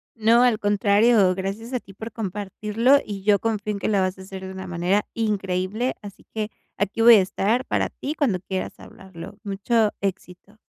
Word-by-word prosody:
No, 230 +2 +4
al 240 -4 +3
contrario. 205 0 +3
Gracias 200 +6 -5
a 250 - 0
ti 195 - -16
por 220 +4 -8
compartirlo 210 +4 +1
y 200 -2 -6
yo 205 0 +4
confío 215 -2 -2
en 200 - -5
que - - -2
lo 205 -2 +2
vas 185 0 -1
a - - -11
hacer 190 0 -8
de 190 - -7
una 190 0 -7
manera 175 +4 0
increíble, 205 +1 -1
así 200 -2 -12
que 215 -1 -3 0.3
aquí 205 +3 -1
voy 235 0 +9
a 205 - +6
estar 215 +6 0
para - - 0
ti 290 - -5
cuando 235 -13 +1
quieras 190 0 -4
hablarlo. 190 0 -11
Mucho 210 +2 +1
éxito. 195 +1 -5
205 Hz, 190 wpm, -23 LUFS, 190-225 Hz, 0.3 s, voy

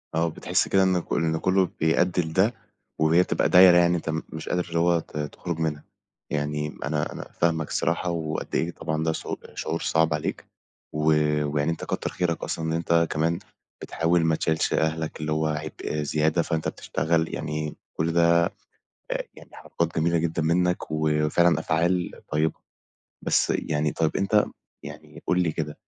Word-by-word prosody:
آه 85 +1 +2
بتحس - - 0
كده 95 -1 +3
إن 95 -1 +3
ك - - -6
إن 80 -1 +1
كلّه 95 +1 +2
بيأدّي 90 +3 +2
لده، 95 +8 +1 0.5
وهي 80 +3 +4
بتبقى - - 0
دايرة 90 -1 +8
يعني 85 0 +4
أنت 80 - -5
م 80 0 -1
مش 80 0 -7
قادر 90 0 0
اللي 85 0 0
هو 85 0 +3
ت 75 - -9
تخرج 80 +3 -4
منها، 75 -2 -2 0.5
يعني 75 0 -2
أنا 75 0 -1
أنا - - -8
فاهمك 80 -2 0
الصراحة، 85 +1 0
وقد 80 -2 -3
إيه 85 +1 0
طبعًا 80 -1 -3
ده 80 - +1
ش - - -6 0.3
شعور - - -3
صعب 80 0 +2
عليك 75 - -3 0.5
و 75 0 -2 0.4
ويعني 75 +2 0
أنت 80 - -5
كتّر - - -2
خيرك 85 -3 -2
أصلًا 80 - -3
إن 80 - -1
أنت 85 0 +2
كمان 80 +3 0 0.4
بتحاول 85 0 +1
ما 80 -1 +3
تشيلش 80 0 0
أهلك 80 0 -1
اللي 75 0 -2
هو 80 0 +1
عبء 75 0 -4
زيادة، 80 +3 +1
فأنت 80 -1 -2
بتشتغل 80 0 -1
يعني 75 0 -3
آآ، - - -12 0.2
كُلّ 80 +1 +1
ده 85 0 +5 0.7
آآ - - -1
يعني - - -14
حركات 85 0 -3
جميلة 85 +1 +2
جدًا 80 -1 -1
منك 90 +1 +1
وفعلًا 80 +2 +2
أفعال 85 +3 +1 0.2
طيبة. 75 +1 +1 0.7
بس - - +2
يعني 75 0 -1
طيب 80 -1 0
أنت 105 +2 +3 0.4
يعني 75 +1 -11
قُل 90 - +2
لي 80 -3 0
كده، 75 -2 -4
80 Hz, 175 wpm, -25 LUFS, 80-85 Hz, 0.7 s, دايرة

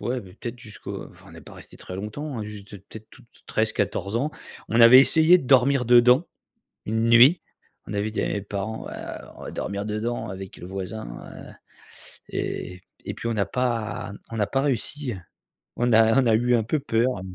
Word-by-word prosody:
ouais 125 +1 -2
peut-être 115 +5 -9
jusqu'au 110 -2 -8
enfin - - -19
on - - -14
est - - -11
pas - - -14
resté - - -14
très 90 - -9
longtemps 125 +7 -5
hein, 110 - -4
juste, 105 -1 -10
peut-être 110 0 -12
tout 130 - -17
t 120 - -21
13-14 110 -2 -1
ans. 140 +6 -1 0.4
On 115 +2 +2
avait 120 +3 +10
essayé 160 +5 +6
de 175 - -5
dormir 135 0 +4
dedans, 125 +5 +6 0.6
une 110 +2 0
nuit. 125 +9 +7 0.5
On - - -6
avait 105 +1 -1
dit 105 - -2
à - - 0
mes 100 - -2
parents: 100 +2 -5
«Ouais - - -7 0.4
on - - -12
va - - -7
dormir 100 0 -4
dedans 110 +3 -3
avec 95 0 -8
le 90 - -9
voisin», 95 - -6 0.4
heu - - -13 0.8
et 90 0 -5 0.2
et - - -4
puis 115 - -5
on 115 - -1
n'a 100 -2 0
pas 115 -4 -2 0.2
on 115 - -6
n'a 105 -2 +1
pas 135 - 0
réussi, 140 0 -2
heu. - - -8 0.6
On 120 0 +1
a 115 +3 +5
on 130 - 0
a 115 - +4
eu 120 +2 +3
un 115 - 0
peu 150 +7 -1
peur. 115 -3 0
115 Hz, 205 wpm, -24 LUFS, 105-125 Hz, 0.8 s, avait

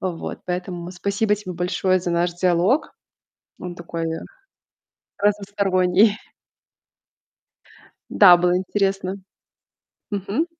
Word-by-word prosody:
Вот, 180 -3 -5
поэтому 180 -1 -4
спасибо 200 +3 0
тебе 195 -3 -7
большое 180 +1 0
за 175 0 -3
наш 170 +1 +1
диалог. 180 - +1 0.7
Он 180 -1 -7
такой 170 -1 -5 1.1
разносторонний. 200 0 +2 1.9
Да, 180 -4 +8
было 180 +1 +2
интересно. 195 0 -1 0.9
Мгм. 205 - -1
185 Hz, 85 wpm, -22 LUFS, 175-200 Hz, 1.9 s, Да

